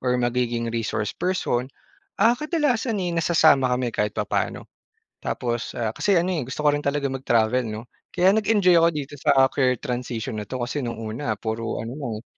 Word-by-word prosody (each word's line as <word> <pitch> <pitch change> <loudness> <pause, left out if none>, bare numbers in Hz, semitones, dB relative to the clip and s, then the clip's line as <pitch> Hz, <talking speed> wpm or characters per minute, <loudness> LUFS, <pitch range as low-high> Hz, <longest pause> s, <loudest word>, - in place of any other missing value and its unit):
or 125 -1 +1
magiging 120 -1 -1
resource 105 -2 -2
person. 170 -9 -1 0.5
Ah, 225 +4 +5
kadalasan 260 -5 0
eh 175 - -2
nasasama 160 -5 +4
kami 125 -2 -2
kahit 105 -1 -1
papaano. - - -2 0.6
Tapos, 120 0 -3
ah 115 -2 -1
kasi 200 -3 +2
ano 180 +2 +1
eh, 160 - -1
gusto 150 +3 -4
ko 145 - +5
rin 145 - -1
talaga 140 0 -1
mag-travel 125 -2 +2
'no? 110 +2 -6 0.2
Kaya 185 +2 +3
nag-enjoy 205 -4 +3
ako 170 - +5
dito 145 -3 -5
sa 140 -3 +5
career 125 -3 +2
transition 120 -3 -4
na - - -7
'to 130 - -3
kasi 140 +3 -3
no'ng 120 -2 -4
una, 115 +6 -3
puro 115 0 -3
ano 120 - -6
lang 130 -6 -4
eh, - - -31
130 Hz, 185 wpm, -24 LUFS, 115-170 Hz, 0.6 s, Ah